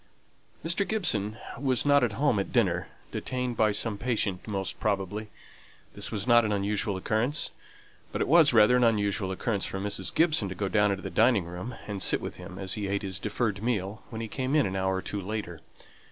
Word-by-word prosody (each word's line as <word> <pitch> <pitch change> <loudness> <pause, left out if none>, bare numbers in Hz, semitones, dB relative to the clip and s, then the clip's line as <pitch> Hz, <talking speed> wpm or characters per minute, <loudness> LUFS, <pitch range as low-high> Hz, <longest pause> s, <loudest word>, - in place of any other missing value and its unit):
Mr. 170 +3 0
Gibson 110 - 0 0.2
was 130 -2 +2
not 145 -2 +5
at 115 -4 +1
home 140 -6 +2
at 100 - -3
dinner 90 -7 +1 0.2
detained 125 -1 -3
by 110 -1 +3
some 105 0 -1
patient, 110 -6 -1
most 95 -3 -3
probably. 105 +1 -2 0.6
This - - -2
was 105 -2 -2
not 120 -1 +6
an 105 - -1
unusual 100 0 0
occurrence; 110 +9 0 0.6
but - - -3
it - - 0
was 160 0 +6
rather 115 +1 +6
an 125 - +3
unusual 100 -4 +1
occurrence 100 +1 -1
for 95 - -4
Mrs. 100 +1 -2
Gibson 155 - +3
to 95 - -6
go 100 +1 -2
down 105 0 +3
into 95 -1 -2
the - - -5
dining 110 -5 +3
room, 90 +8 -6
and 100 -2 -5
sit - - +3
with - - -6
him 90 - -9
as 95 -1 -1
he 105 -2 -3
ate 100 +1 -1
his 95 -1 -4
deferred 105 -2 -1
meal 105 -3 -2
when 110 - -6
he 115 - -4
came 130 +5 -2
in 150 - +4
an 95 - -3
hour 95 0 0
or 95 - -2
two 100 0 -4
later. 95 -5 -5
105 Hz, 210 wpm, -28 LUFS, 95-120 Hz, 0.6 s, not